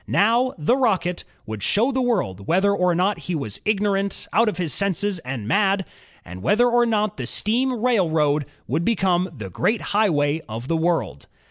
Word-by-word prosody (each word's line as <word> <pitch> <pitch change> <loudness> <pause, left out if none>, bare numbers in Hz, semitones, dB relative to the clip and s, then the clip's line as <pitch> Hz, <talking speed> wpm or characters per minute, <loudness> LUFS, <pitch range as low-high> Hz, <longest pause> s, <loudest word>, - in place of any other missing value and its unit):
Now, 235 +5 +2
the 160 +11 +2
Rocket 190 -9 0 0.2
would 110 -1 -6
show 225 - +2
the 260 0 0
world 140 - -1
whether 190 +4 +3
or 180 -3 +1
not 190 +4 +1
he 175 - 0
was 135 -9 -5
"ignorant," 200 -1 0
"out 230 +1 +4
of 205 - -5
his 170 -4 -1
senses," 200 -1 -1
and 125 -7 -6
"mad," 195 - +2 0.4
and 90 +1 -9
whether 220 - +3
or 240 0 +3
not 215 -3 0
the 125 -3 -4
steam 235 - 0
railroad 160 - +2 0.2
would 155 +7 -1
become 185 -4 +1
the 110 - -8
"great 215 - 0
highway 160 -7 +2
of 115 +3 -6
the 165 - 0
world." 160 - -1
190 Hz, 175 wpm, -22 LUFS, 150-215 Hz, 0.4 s, out